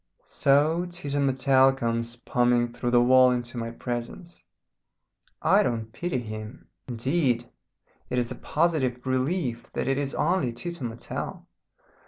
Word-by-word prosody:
So 155 +5 +2
Tito 145 -5 -3
Mattel 135 -1 +4
comes 115 -1 -2
pumming 120 0 +1
through 120 0 -2
the 120 0 +5
wall 130 +1 +6
into 120 0 -2
my 115 0 -3
presence. 120 +9 -6 1.0
I - - +5
don't 110 -2 -2
pity 175 +2 -2
him. 110 0 -7 0.2
Indeed 125 0 0 0.6
it 125 - -2
is 120 -1 0
a - - -4
positive 145 -7 0
relief 130 -1 -1
that - - -2
it 135 +1 +1
is 140 -1 -2
only 160 -7 +1
Tito 170 +5 -6
Mattel. 115 0 -6
125 Hz, 135 wpm, -26 LUFS, 120-145 Hz, 1.0 s, wall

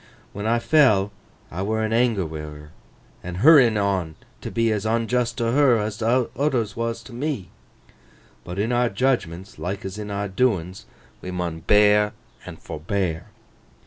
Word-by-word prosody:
When 105 +2 -4
I 115 +1 +3
fell, 115 -8 +3 0.4
I 90 - -4
were 110 +2 -1
in 110 - -2
anger 115 -5 +2
wi' 80 -1 -6
her, 75 0 -9 0.5
an' 90 0 -6
hurryin 125 - +6
on 95 -6 -1 0.3
t' - - -5
be 115 -1 +1
as 105 -2 -1
onjust 115 +2 0
t' 120 - -1
her 125 +1 +4
as 105 0 -3
oothers 120 0 0
was 115 0 -3
t' - - -13
me. 125 - -4 0.9
But 90 +1 -7
in 110 +4 0
our 120 0 +2
judgments, 95 -6 -2
like 95 +3 -4
as 95 +2 -6
in 105 -1 -6
our 100 0 -2
doins, 95 -4 -1 0.3
we 90 - -7
mun 90 -3 -3
bear 105 +3 +4 0.3
and - - -8
forbear. 85 +1 -3
105 Hz, 160 wpm, -23 LUFS, 95-115 Hz, 0.9 s, hurryin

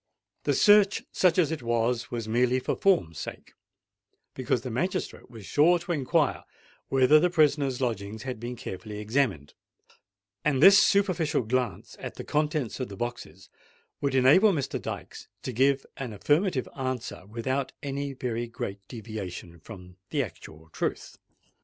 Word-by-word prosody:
The - - +2
search, 205 -1 +5
such 180 -2 +3
as 165 -4 +3
it 160 - -3
was, 120 0 0
was 115 -2 -4
merely 125 +3 +2
for 130 - -2
form's 100 - +1
sake; - - -8 0.8
because 125 -2 -1
the 125 - -5
magistrate 170 +6 -3
was 115 -5 -11
sure 165 - +4
to 175 +1 -6
inquire 140 -6 +1 0.5
whether 135 +3 +5
the 180 - +2
prisoner's 145 -6 +2
lodgings 110 -3 -3
had 125 -3 -5
been 120 +2 -5
carefully 105 -2 -7
examined; 105 - -1 0.9
and 145 -3 +1
this 195 +6 +9
superficial 185 - +2
glance 120 -5 -2
at - - -7
the - - -7
contents 150 -5 -1
of 130 - -3
the 100 - -9
boxes 110 -7 -6 0.5
would 140 -2 0
enable 145 +12 +6
Mr. 145 -7 -2
Dykes - - -7 0.2
to 130 - -4
give 135 +3 +2
an 125 -5 -5
affirmative 145 - +1
answer 130 -8 -4
without 130 +5 -2
any 140 0 -3
very 120 -2 -3
great 100 -3 -5
deviation 95 -7 -7
from 90 0 -12
the 145 -3 0
actual 80 -7 -11
truth. - - -4
130 Hz, 150 wpm, -27 LUFS, 110-150 Hz, 0.9 s, this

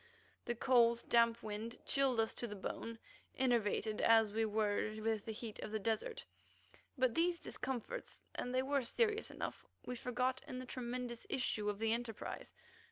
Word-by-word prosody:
The 240 - -1
cold, 235 -1 +4
damp 235 -1 +4
wind 215 +2 -4
chilled 270 -4 +3
us 225 0 +2
to 240 - -3
the 210 - -6
bone, 225 +3 -4 0.4
enervated 225 -4 +2
as 225 -2 +6
we 225 +1 +2
were 215 0 +1
with 220 -1 0
the 225 - -3
heat 220 0 -6
of - - -4
the 220 - 0
desert. 225 - -1 0.7
But 255 -2 +3
these 340 +1 +2
discomforts, 265 - -4
and 250 - -3
they 255 +1 +2
were 280 +1 +2
serious 430 - +1
enough, - - -5 0.2
we 250 - -3
forgot 250 +1 0
in 255 - -5
the 255 - -5
tremendous 245 -1 -4
issue 215 -5 +1
of 205 - -2
the 225 +1 +2
enterprise. 230 -2 -4
235 Hz, 165 wpm, -37 LUFS, 220-255 Hz, 0.7 s, as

